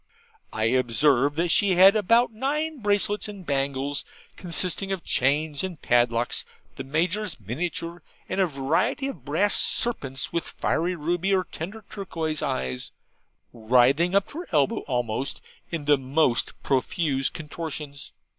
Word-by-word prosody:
I 110 - -1
observed 135 +6 +2
she 200 -2 +4
had 190 +3 +8
about 230 +3 +3
nine 300 +6 -2
bracelets 205 -1 +1
and 200 -3 -9
bangles, 140 0 -1 0.3
consisting 180 +2 -1
of 190 -3 -3
chains 145 +4 +1
and 180 -5 -5
padlocks, 120 0 +1 0.3
the - - -6
Major's 170 +7 -1
miniature, 170 +6 -4 0.3
and 195 - 0
a 185 - +3
variety 160 - 0
of 165 - -9
brass 165 +10 +1
serpents 135 - 0
with 170 - 0
fiery 175 +3 -1
ruby 175 +4 0
or 185 - +1
tender 195 +7 -8
turquoise 165 -6 -4
eyes, 65 -1 -2 0.6
writhing 125 - +3
up 200 - +4
to 310 - -7
her 355 - -7
elbow 145 -4 +2
almost, 125 0 -1 0.3
in 165 -4 -4
the 145 0 +5
most 135 -1 +1
profuse 135 +1 0
contortions. 150 -2 -6
160 Hz, 135 wpm, -25 LUFS, 135-190 Hz, 0.6 s, had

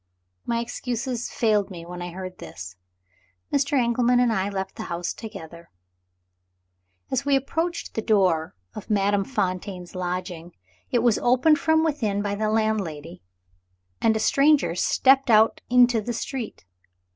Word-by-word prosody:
My 235 0 0
excuses 245 0 -4
failed 210 -3 +1
me 170 -3 -9
when 180 +1 -8
I 175 - -5
heard 185 +1 -8
this. 90 +1 -9 0.8
Mr. 280 0 +1
Engelman 245 +1 +2
and 245 -2 +3
I 195 -1 0
left 190 -1 -4
the - - -6
house 170 0 -3
together. 170 -6 -10 1.4
As 260 - 0
we 285 -1 +2
approached 325 +6 -2
the 220 - -2
door 185 -8 +1 0.2
of - - -9
Madame 200 -1 +2
Fontaine's 185 -5 -3
lodgings, 180 -2 -5 0.4
it 240 -2 +1
was 235 -3 +3
opened 260 +6 +3
from 320 0 +3
within 225 -11 -1
by 205 -1 -2
the 215 +1 -1
landlady, 200 -8 -2 0.8
and 225 -1 +3
a - - 0
stranger 280 - +3
stepped 265 +9 +3
out 220 0 +4
into 245 -2 +5
the 240 +3 -4
street. 235 - -5
215 Hz, 145 wpm, -24 LUFS, 185-245 Hz, 1.4 s, into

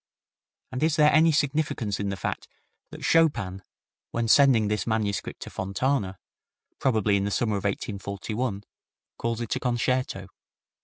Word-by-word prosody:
And 130 - -4
is 155 0 +2
there 150 -1 +5
any 160 +2 +6
significance 145 -8 0
in 100 -1 -1
the 100 - -3
fact - - -4 0.4
that - - -8
Chopin, 120 - +2 0.5
when 115 0 -1
sending 120 -3 +5
this 105 +2 -1
manuscript 110 -3 -2
to - - -10
Fontana, 100 +1 -1 0.6
probably 105 -5 +2
in 100 - 0
the - - 0
summer 110 +1 0
of 100 - -6
1841, 100 +2 -3 0.6
calls 115 0 -2
it 115 - -2
a - - -2
concerto? 125 -4 -1
115 Hz, 145 wpm, -26 LUFS, 100-135 Hz, 0.6 s, any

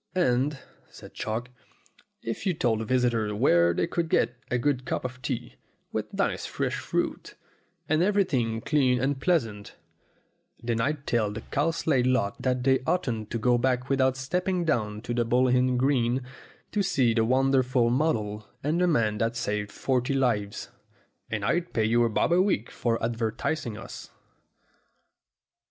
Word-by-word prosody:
"And," 140 -4 +2 0.3
said - - -13
Chalk, 115 +3 -3 0.7
"if 115 - -4
you 180 - +1
told 110 -5 0
visitors 120 -4 +1
where 85 -7 +4
they - - 0
could 170 -1 -2
get 125 - +2
a 125 - +1
good 130 +1 0
cup 130 - -3
of 130 0 -6
tea, 120 -1 -4 0.3
with - - -3
nice - - -1
fresh - - -2
fruit, - - -3 0.5
and 155 +1 +2
everything 145 - +1
clean 130 -4 +2
and 135 +1 -1
pleasant, 115 - 0 0.8
then 115 -1 -1
I'd 145 +2 -1
tell 110 -4 +1
the 110 +2 -6
Cow 145 +7 0
slade 145 -6 +1
lot 130 -6 0
that 125 -1 0
they 130 0 +4
oughtn't 115 - -1
to 115 - -2
go 120 +2 +2
back 125 +1 0
without 130 -1 +2
stepping 180 +6 -1
down 105 -8 -1
to 120 - -4
the 120 0 +1
Bull 125 +3 +2
Inn 125 0 +2
green, 130 -1 +1 0.5
to 210 - +1
see 130 -11 +2
the 115 -1 +2
wonderful 130 -1 +2
model 110 -7 0 0.2
and 155 +5 +1
the 180 - +4
man 110 -10 +1
that 115 +2 0
saved 105 -4 -2
forty 130 0 0
lives. 110 -7 0 0.6
And 105 -3 -2
I'd 170 +9 0
pay 110 -2 +2
you 120 +2 +3
a - - +1
bob 115 - +1
a 180 - +5
week 185 - 0
for 115 -1 0
advertising 115 +2 -2
us." - - -9
125 Hz, 160 wpm, -27 LUFS, 115-140 Hz, 0.8 s, a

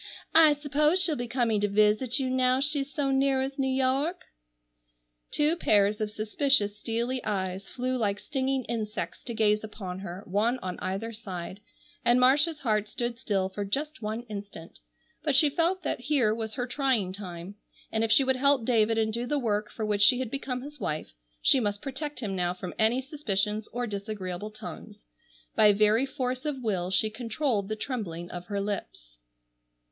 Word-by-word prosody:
I 315 -2 +8
suppose 300 +4 +2
she'll 340 -4 +3
be 245 -2 -4
coming 230 -4 +1
to 205 - +2
visit 215 +4 +3
you 265 - 0
now 255 0 +2
she's 285 0 +1
so 280 -3 0
near 270 0 +2
as 270 +1 -5
New 265 -1 +1
York." 270 +6 0 1.1
Two 300 +3 +3
pairs 210 - +3
of 215 - 0
suspicious 215 0 +2
steely 235 +3 -2
eyes 190 -2 -3
flew 255 0 -2
like 205 -4 0
stinging 265 +1 -1
insects 220 -2 -4
to 235 - -4
gaze 210 -1 +2
upon 190 -4 -6
her, 190 0 -7
one 215 +6 +1
on 185 -1 -4
either 195 +5 -3
side, 185 -3 -7 0.4
and 240 +1 +4
Marcia's 290 +5 +4
heart 215 -4 +1
stood 240 +2 -4
still 195 -4 0
for 200 +2 -5
just 290 +9 -3
one 220 +2 -3
instant, 200 -7 -9 0.4
but 295 -3 +1
she 290 +2 +6
felt 345 +5 +1
that 295 - -2
here 250 -4 +2
was 220 -1 -4
her 245 - -2
trying 250 -8 0
time, 180 -1 -7 0.4
and 220 0 +1
if 225 - 0
she 270 - +6
would 265 0 +1
help 275 -2 +3
David 225 -2 +3
and 220 -1 +1
do 240 +2 -1
the 295 - 0
work 210 -5 -1
for 220 - -4
which 205 -1 0
she 230 +4 +7
had 255 -3 -3
become 255 -2 -3
his 295 +1 -10
wife, 150 - -3 0.3
she 265 - +6
must 205 -3 -1
protect 290 +2 -5
him 200 -4 -3
now 180 -1 0
from 180 -1 -6
any 225 +4 +3
suspicions 215 -7 -2
or 245 +1 -3
disagreeable 200 -2 -5
tongues. 215 -1 -10 0.5
By 210 -2 +6
very 215 +5 +4
force 255 -1 -3
of 285 -4 -3
will 185 -5 -1
she 205 +3 +1
controlled 230 -1 -1
the 215 - -1
trembling 195 -8 -5
of 175 0 -6
her 200 -1 -2
lips. - - -5
225 Hz, 180 wpm, -28 LUFS, 205-265 Hz, 1.1 s, I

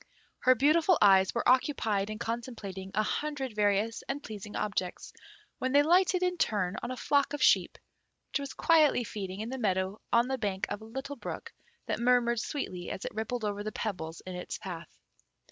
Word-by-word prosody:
Her 255 0 +5
beautiful 315 +7 +4
eyes 190 -2 +6
were 235 - 0
occupied 225 -6 +2
in 215 - -4
contemplating 220 -5 -5
a 215 - +3
hundred 275 0 -2
various 210 +2 +1
and 280 +2 -3
pleasing 210 -1 -8
objects, 200 -4 -3 0.5
when 260 +1 -1
they 285 +1 +6
lighted 365 +3 +3
in 360 -1 0
turn 200 -4 +1
on - - -4
a 255 - -4
flock 285 +1 +2
of 290 - -1
sheep - - +4 0.5
which - - 0
was 280 -1 -6
quietly 310 -6 +4
feeding 195 -3 -5
in 225 - -4
the 265 +1 -4
meadow 190 -2 0
on 235 +1 +4
the 265 0 -2
bank 195 -4 -1
of 205 +1 -4
a - - -10
little 265 +5 -6
brook - - -7 0.3
that - - -2
murmured 240 -1 +3
sweetly 185 -9 -4
as - - -5
it - - -4
rippled 220 +1 -3
over 205 0 -2
the 215 - -3
pebbles 170 -8 -4
in 185 - -6
its 180 0 -5
path. 170 -3 -8
225 Hz, 190 wpm, -30 LUFS, 200-270 Hz, 0.5 s, eyes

